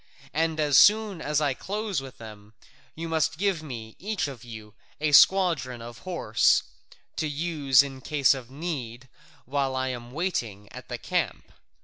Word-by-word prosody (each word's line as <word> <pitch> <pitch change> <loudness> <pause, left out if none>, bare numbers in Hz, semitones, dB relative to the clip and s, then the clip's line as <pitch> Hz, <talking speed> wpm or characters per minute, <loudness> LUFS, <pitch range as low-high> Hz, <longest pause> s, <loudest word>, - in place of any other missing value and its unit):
And 160 0 0
as 145 -2 +5
soon 210 -4 +4
as 150 0 0
I 145 -3 +1
close 205 - -3
with 135 -1 -11
them, 105 -1 -12 0.4
you 165 +1 -5
must 160 -1 0
give 195 -3 0
me, 115 -7 -8
each 205 -4 -2
of 130 -5 -9
you, 110 -3 -10 0.3
a 150 0 0
squadron 160 -7 +5
of 120 0 -10
horse, 170 -12 +2 0.5
to 155 - 0
use 145 -3 +3
in 135 -2 -8
case 140 0 +3
of 130 -3 -8
need 135 -5 -5 0.4
while 135 0 -1
I 130 0 -1
am 120 -2 -6
waiting 120 - -3
at - - -10
the - - -3
camp. - - -2
140 Hz, 160 wpm, -26 LUFS, 120-165 Hz, 0.5 s, as